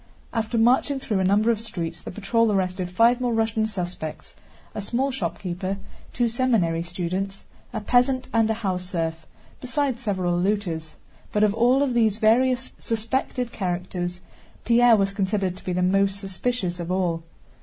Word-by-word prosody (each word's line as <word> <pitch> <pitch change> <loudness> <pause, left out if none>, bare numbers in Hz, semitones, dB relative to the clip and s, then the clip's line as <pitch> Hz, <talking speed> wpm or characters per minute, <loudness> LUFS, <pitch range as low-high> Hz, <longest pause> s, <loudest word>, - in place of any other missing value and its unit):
After 225 0 -1
marching 255 +4 +3
through 215 -7 -1
a - - +2
number 205 +5 +4
of 220 -2 -1
streets 170 -7 -5
the - - -7
patrol 215 +3 +1
arrested 185 -2 -1
five 230 +6 +4
more 245 -2 +1
Russian 225 0 +1
suspects: 175 -6 -5 0.4
a - - -4
small 255 +7 0
shopkeeper, 190 -6 -3 0.3
two 240 -1 +1
seminary 225 -9 +1
students, 180 +3 -4 0.3
a 220 -3 -3
peasant, 250 +4 +2
and 225 -1 +3
a 220 - +1
house 190 -5 -2
serf, 165 -3 -3 0.3
besides 255 0 -1
several 185 -5 0
looters. 175 -5 -1 0.4
But 210 - +2
of 210 -1 +4
all 245 +5 +4
these 230 -5 +2
various 250 +3 +3
suspected 235 +2 -2
characters, 180 -1 -3 0.4
Pierre 240 0 +6
was 195 -1 +1
considered 195 -2 0
to - - -14
be 185 - -3
the 180 +1 +1
most 195 +1 +2
suspicious 195 -1 -2
of 170 +1 -4
all. 175 -3 0
205 Hz, 155 wpm, -24 LUFS, 180-235 Hz, 0.4 s, Pierre